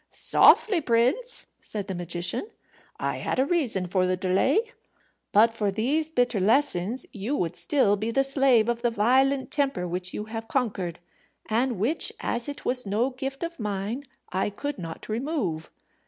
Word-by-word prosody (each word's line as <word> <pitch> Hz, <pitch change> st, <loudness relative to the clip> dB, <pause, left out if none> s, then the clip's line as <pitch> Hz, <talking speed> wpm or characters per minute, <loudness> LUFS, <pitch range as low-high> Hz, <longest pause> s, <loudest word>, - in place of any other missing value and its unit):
"Softly, 390 Hz, -7 st, +5 dB
prince," 260 Hz, -, +1 dB, 0.2 s
said 205 Hz, -2 st, -5 dB
the 195 Hz, -, -4 dB
magician; 175 Hz, -, -2 dB, 0.5 s
"I -, -, -2 dB
had -, -, -3 dB
a 260 Hz, -, +3 dB
reason 265 Hz, -, +1 dB
for 185 Hz, +1 st, +1 dB
the 185 Hz, 0 st, 0 dB
delay. 190 Hz, -, +2 dB, 0.7 s
But 225 Hz, +2 st, +5 dB
for 210 Hz, -3 st, -1 dB
these 275 Hz, +11 st, 0 dB
bitter 245 Hz, -7 st, +1 dB
lessons 220 Hz, +1 st, +1 dB
you 220 Hz, +7 st, -2 dB
would 175 Hz, -, -2 dB
still 255 Hz, -6 st, +2 dB
be 215 Hz, +3 st, -3 dB
the 270 Hz, +4 st, +2 dB
slave 270 Hz, -5 st, +3 dB
of 235 Hz, 0 st, -1 dB
the 240 Hz, -, +2 dB
violent 260 Hz, +5 st, +2 dB
temper 275 Hz, -11 st, 0 dB
which 180 Hz, +1 st, -4 dB
you 210 Hz, -, -5 dB
have 225 Hz, +1 st, -6 dB
conquered, 195 Hz, -11 st, -2 dB, 0.5 s
and 240 Hz, +1 st, +1 dB
which, 235 Hz, -, 0 dB
as 240 Hz, +4 st, -2 dB
it 285 Hz, -, -7 dB
was 250 Hz, 0 st, +2 dB
no 215 Hz, +6 st, 0 dB
gift 270 Hz, +3 st, -5 dB
of 335 Hz, -2 st, -5 dB
mine, 210 Hz, +4 st, -3 dB, 0.3 s
I 190 Hz, +3 st, 0 dB
could 285 Hz, +5 st, -5 dB
not 165 Hz, -2 st, -7 dB
remove. 220 Hz, -, -2 dB
230 Hz, 165 wpm, -26 LUFS, 195-270 Hz, 0.7 s, Softly